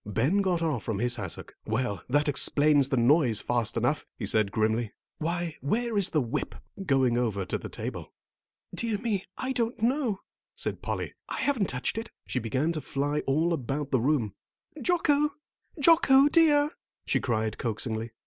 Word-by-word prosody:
Ben 130 - +1
got 180 -3 0
off 150 -8 0
from 110 -1 -3
his 120 +3 +1
hassock. 95 -6 -6
"Well, 110 -2 -2
that 145 +3 +2
explains 145 0 +4
the 135 - +1
noise 120 -2 +4
fast 120 -3 -1
enough," - - +1
he - - -4
said 110 -2 +2
grimly. 110 +1 0 0.3
"Why, 170 0 -2
where 230 - -1
is 200 -3 +4
the 155 - +1
whip?" 120 - -3 0.3
going 130 -7 +2
over 105 -6 -1
to - - -2
the - - -7
table. - - -6 0.6
"Dear 225 -3 -1
me, 205 -3 -2
I 260 0 -2
don't 235 -1 -1
know," 245 -5 +1 0.3
said - - -4
Polly. - - -3 0.2
"I - - -3
haven't 255 -10 +1
touched 125 - -2
it," 225 - -6
and - - -19
she 125 - +1
began 130 +8 0
to 155 -2 -3
fly 145 +2 -1
all 160 +5 +2
about 140 0 -3
the 130 - +2
room. 125 -7 +1 0.5
"Jocko, 300 -1 +2 0.5
Jocko 285 -3 +6
dear," 295 -2 +4 0.3
she - - +1
cried 110 -3 -1
coaxingly. 115 0 -3
145 Hz, 170 wpm, -28 LUFS, -, 0.6 s, Jocko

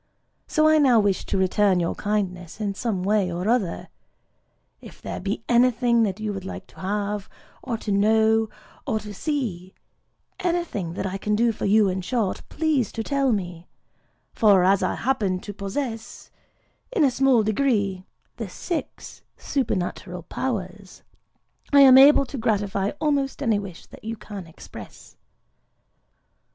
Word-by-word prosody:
So 310 -1 +3
I 310 0 +5
now 255 -6 +5
wish 200 -2 0
to 195 - -1
return 190 0 +2
your 170 - 0
kindness 185 -4 -3
in 205 -2 -2
some 200 -3 -2
way 200 -2 +1
or 175 +3 -3
other. 220 -7 0 0.9
If - - -13
there - - -6
be - - -3
anything 240 -1 +3
that 205 -2 0
you 215 -1 -3
would 195 -1 -6
like 190 - -7
to - - -17
have, 205 +1 -3 0.3
or 240 -4 -3
to 215 - -5
know, 220 +2 +3 0.4
or 225 -5 0
to 210 -1 -9
see,—anything 245 - -4
that 190 - -4
I 195 +1 -3
can 210 +2 0
do 230 +2 +3
for 220 - -5
you, 210 +1 +4
in 185 0 -1
short,—please 255 - -1
to 225 - -3
tell 275 +1 +1
me; 175 -5 -4 0.7
for 200 -4 +5
as 195 +1 +3
I - - 0
happen 205 -8 0
to 205 - -7
possess, 225 +3 -5 0.6
in 420 -10 +2
a 275 - +4
small 260 -3 +3
degree, 205 -5 0 0.3
the - - -5
Six 345 -4 -6 0.2
Supernatural 180 - -3
Powers, 195 -4 -5 0.7
I 285 -1 +7
am 265 -1 +9
able 275 0 +7
to 270 0 -7
gratify 205 -3 0
almost 285 -2 0
any 225 -5 +2
wish 195 -4 -9
that - - -15
you 225 +1 -5
can 200 -4 -9
express." 160 - -12
210 Hz, 150 wpm, -24 LUFS, 195-250 Hz, 0.9 s, am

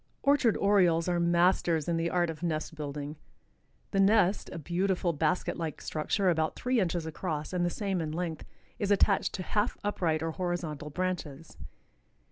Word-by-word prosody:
Orchard 275 -6 +3
Orioles 180 -5 +3
are 175 -1 +1
masters 170 -2 +2
in 170 - +1
the 165 0 0
art 175 -2 +1
of 160 - -11
nest 160 -2 -2
building. 150 -1 -5 0.7
The 195 - +1
nest, 195 -1 +3
a - - -6
beautiful 175 +2 0
basket 160 +4 0
like 165 -3 -4
structure 180 +5 0
about 160 -1 0
three 250 -1 0
inches 175 -4 0
across 160 -1 -4
and 180 -1 +1
the 175 - +2
same 195 -1 -2
in 155 -1 -3
length, 165 -1 -3 0.4
is 205 - -1
attached 200 -1 +3
to 185 - -4
half 210 +5 0
upright 165 -6 0
or 165 - -1
horizontal 165 -4 -3
branches. 165 -3 -4
175 Hz, 165 wpm, -30 LUFS, 160-190 Hz, 0.7 s, Orchard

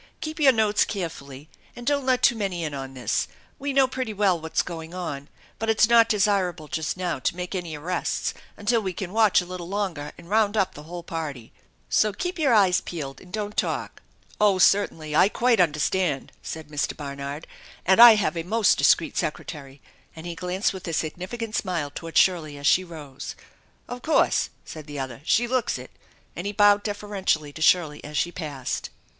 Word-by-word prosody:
Keep 310 +1 -5
your 280 -3 +7
notes 215 -3 +2
carefully 150 -7 -6 0.3
and 240 - -9
don't 280 -1 0
let 255 -1 +2
too 240 - +5
many 195 -5 -2
in 155 -2 -3
on 135 -1 -6
this. 120 -4 -1 0.3
We 280 +1 -2
know 270 -1 +5
pretty 255 -3 -4
well 195 -4 +2
what's 160 0 -1
going 165 0 -7
on, 145 -6 -5 0.3
but 225 +1 -2
it's 220 -1 +4
not 230 -1 +5
desirable 190 -6 +1
just 160 +1 -3
now 180 -5 -2
to 130 - -1
make 180 +1 -5
any 175 -4 -4
arrests 175 +5 -2 0.2
until 220 +3 +1
we 190 -3 -3
can 185 +1 -6
watch 220 -4 +4
a - - -8
little 180 -1 -7
longer 185 -8 -3
and 170 - -14
round 215 +1 +2
up 195 -3 +1
the 150 - -10
whole 175 0 -6
party. 150 -9 -6 0.3
So 215 -1 +2
keep 360 - -4
your 285 -5 +3
eyes 195 -5 +4
peeled, 140 -6 -6
and 180 - -15
don't 210 0 -4
talk." - - -2 0.2
" - - -15
Oh, 205 -3 +5
certainly! 165 -6 +2
I 190 - +6
quite 235 0 +2
understand/' 150 -1 +1
said 160 -2 -7
Mr. 150 -1 -2
Barnard, 140 +1 -6 0.2
" - - -21
and 190 +5 +5
I 235 -2 +11
have 210 -4 0
a 165 - -1
most 215 +6 +2
discreet - - +3
secretary," 140 -3 -5 0.3
and 160 +1 -10
he 175 - -4
glanced 180 +4 -1
with 190 -1 -8
a 165 - -3
significant 185 +9 -3
smile 170 -7 -2
toward 165 +1 -5
Shirley 160 -6 +3
as 145 - -8
she 185 - +5
rose. 150 -5 -9 0.3
" - - -37
Of 245 0 -7
course! 315 - +2
" - - -38
said 155 -1 -9
the 145 -1 -7
other. 130 -2 -5
" - - -26
She 240 +6 +3
looks 255 0 0
it," - - -10 0.4
and - - -4
he 205 - -3
bowed 205 0 +5
deferentially 200 -8 -2
to 160 - -9
Shirley 160 -3 +3
as 150 0 -6
she 175 - +1
passed. 145 -7 -4
180 Hz, 205 wpm, -25 LUFS, 155-210 Hz, 0.4 s, I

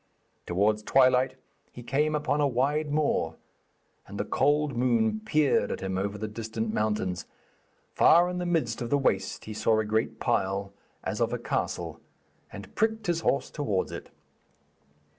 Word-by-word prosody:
Towards 105 +4 +2
twilight 130 +2 +3 0.4
he 120 - -10
came 150 +5 +1
upon 150 0 0
a 145 - +4
wide 145 +4 0
moor, 150 0 0 0.7
and - - -8
the - - -1
cold 145 0 +1
moon 115 -3 +2
peered 145 -8 +2
at - - -4
him 95 0 -3
over 100 +2 -2
the 110 +1 -4
distant 110 0 -4
mountains. 105 -5 -1 0.7
Far 170 +2 +6
in 180 0 -3
the 180 - -2
midst 150 -11 0
of 120 - -3
the 145 - +3
waste 95 -8 -1
he 110 - -6
saw 110 +1 +2
a 110 - 0
great 110 +1 -1
pile, 100 +1 -1 0.3
as - - -3
of - - +1
a - - 0
castle, - - -3 0.5
and 100 0 -10
pricked 220 0 0
his 170 -2 0
horse 140 - 0
towards 105 -11 -1
it. - - -8
120 Hz, 160 wpm, -28 LUFS, 105-150 Hz, 0.7 s, Far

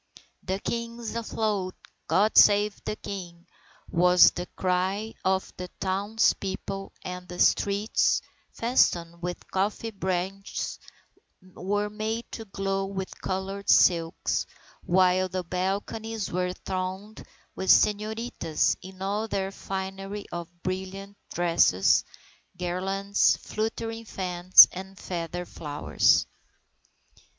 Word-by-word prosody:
"The 190 - -2
King 235 +3 -4
is 230 -1 -5
afloat! 215 -5 -2 0.3
God 210 +3 +2
save 205 0 +5
the - - -2
King!" 175 -5 -8 0.4
was 180 +1 +6
the 180 0 -5
cry 190 +4 -1
of 190 0 0
the 180 - -5
townspeople 195 0 -1
and 180 -1 -6
the 180 0 -8
streets, 200 +4 +2 0.3
festooned 170 -8 +1
with 175 0 -6
coffee 205 +4 -1
branches, 190 0 -3 0.6
were 205 +3 -3
made 220 +2 -3
to 225 - -7
glow 195 -1 -2
with 190 -1 -6
coloured 195 +1 -4
silks, 165 -1 +3 0.4
while 185 0 +3
the 185 0 -3
balconies 200 +5 -3
were 180 0 -1
thronged 190 +3 -5 0.3
with 190 0 -3
señoritas 210 -5 +2
in 190 0 -9
all 205 +3 -1
their 195 -2 -2
finery 195 +1 -5
of 170 -1 -5
brilliant 190 +2 -5 0.2
dresses, 170 - +3 0.5
garlands, 195 +3 +1
fluttering 225 +1 -4
fans, 180 -2 +6
and 190 +1 -9
feather 175 0 -4
flowers. 150 -3 +1
190 Hz, 105 wpm, -27 LUFS, 180-205 Hz, 0.6 s, was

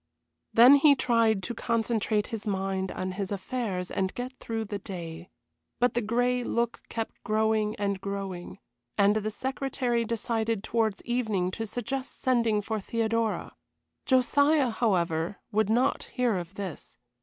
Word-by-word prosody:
Then 250 +5 +8
he 285 0 +6
tried 230 -6 +2
to 240 - -3
concentrate 225 -2 0
his 220 -1 -4
mind 190 -1 -1
on 185 0 -3
his 190 +1 -4
affairs 200 -3 -3
and 190 0 0
get 250 +1 -4
through 225 -1 -3
the 205 -1 -4
day. 175 -3 -7 0.5
But 245 -1 +3
the 240 - +1
gray 245 +3 +1
look 235 0 -1
kept 225 -1 -5
growing 215 -1 +1
and 200 -2 -2
growing, 195 -3 -5 0.4
and 205 +1 +4
the 215 0 -1
secretary 255 0 -1
decided 225 -1 -1
towards 220 -3 0
evening 220 -7 0
to 225 +3 -4
suggest 255 +4 -4
sending 230 -5 +2
for 220 +1 -2
Theodora. 225 +1 -1 0.5
Josiah, 285 +1 +4
however, 175 -6 0
would 215 -1 +2
not 245 +5 +2
hear 245 -4 +1
of 175 +2 -8
this. 190 -5 -6
220 Hz, 145 wpm, -28 LUFS, 200-240 Hz, 0.5 s, Then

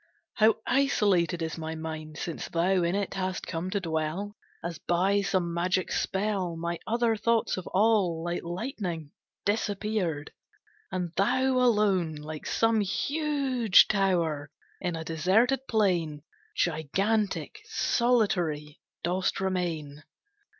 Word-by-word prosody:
How 220 0 +4
isolated 195 -11 +2
is 160 +1 -4
my 160 0 -4
mind, 160 -1 -6
Since 165 -1 -4
thou 180 +2 +2
in 170 +2 +1
it 200 -1 -2
hast 185 -1 -3
come 170 +1 -3
to 200 - 0
dwell! 165 +4 -2 0.3
As 170 -2 -4
by 190 +4 +2
some 185 -3 0
magic 180 +2 0
spell, 190 -3 -1
My 170 +1 -3
other 235 0 +2
thoughts 230 +1 +1
have 185 - -3
all, 195 -5 +2
Like 175 0 -2
lightning, 175 - -4 0.3
disappeared; 205 -7 -1 0.6
And 180 -2 -2
thou, 245 +7 +2
alone, 210 -10 +3
like 150 +1 -7
some 225 -1 +2
huge 270 - +3
tower, 170 -8 +1 0.3
In 175 -2 -2
a 165 - -4
deserted 190 +12 +2
plain, 175 -9 +1 0.3
Gigantic, 195 - 0
solitary, 190 - +1 0.2
dost 180 +2 0
remain. 170 -6 -2
185 Hz, 120 wpm, -28 LUFS, 165-215 Hz, 0.6 s, How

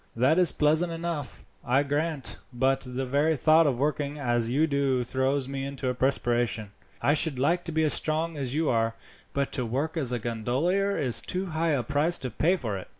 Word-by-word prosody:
That 130 +9 +3
is 180 -3 +7
pleasant 155 +3 +2
enough, 165 -4 -5 0.2
I 130 +3 +2
grant; 145 0 -2
but 135 +2 +1
the 125 +1 -3
very 145 +4 +1
thought 155 +4 +5
of 125 -4 -1
working 145 0 -1
as 120 -4 0
you 145 +6 +2
do 140 -4 0
throws 130 +2 -1
me 135 0 -4
into 135 -1 -3
a - - 0
perspiration. 120 -5 0 0.3
I 145 - +4
should 155 -2 +2
like 170 +7 +1
to 170 - -3
be 160 0 +1
as 155 - +2
strong 160 +1 -1
as 135 -2 -4
you 160 0 0
are, 115 -2 +1 0.4
but 140 -1 -2
to 125 - -1
work 140 +8 -2
as 135 -6 +1
a 125 - 0
gondolier 130 - -1
is 125 -4 +2
too 185 +1 -3
high 160 0 +1
a 130 -4 0
price 150 +8 +1
to 125 - -5
pay 170 - +2
for 110 - -4
it." - - -11
140 Hz, 210 wpm, -27 LUFS, 125-160 Hz, 0.4 s, is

